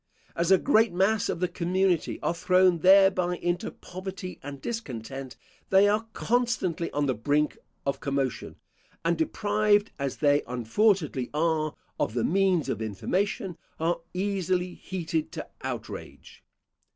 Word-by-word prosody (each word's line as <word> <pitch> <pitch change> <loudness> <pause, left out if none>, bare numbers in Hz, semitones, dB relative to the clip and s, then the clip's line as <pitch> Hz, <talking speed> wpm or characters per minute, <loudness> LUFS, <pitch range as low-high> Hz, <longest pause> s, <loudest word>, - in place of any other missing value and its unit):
As 170 +1 0
a 190 - +7
great 225 0 +3
mass 195 +4 +2
of 170 - -2
the 180 - +2
community 180 0 0
are - - +1
thrown 185 0 +3
thereby 185 -1 +5
into 175 0 -1
poverty 185 0 -8
and 140 0 -7
discontent, 135 - -6 0.3
they 195 +1 +6
are 215 +2 +1
constantly 220 -9 0
on 145 0 0
the 130 - +1
brink 145 +7 0 0.3
of 140 0 -1
commotion; 135 -2 -2 0.5
and 170 +1 +3
deprived, 205 +5 +2
as 140 -2 -2
they 145 -1 +3
unfortunately 130 - +1
are, 155 -1 +1 0.2
of 110 - -1
the 120 - +1
means 185 -2 +2
of - - -2
information, 180 - -2 0.2
are 170 +1 0
easily 185 -2 0
heated 170 -4 -3
to - - -6
outrage. - - -7
175 Hz, 135 wpm, -27 LUFS, 145-195 Hz, 0.5 s, a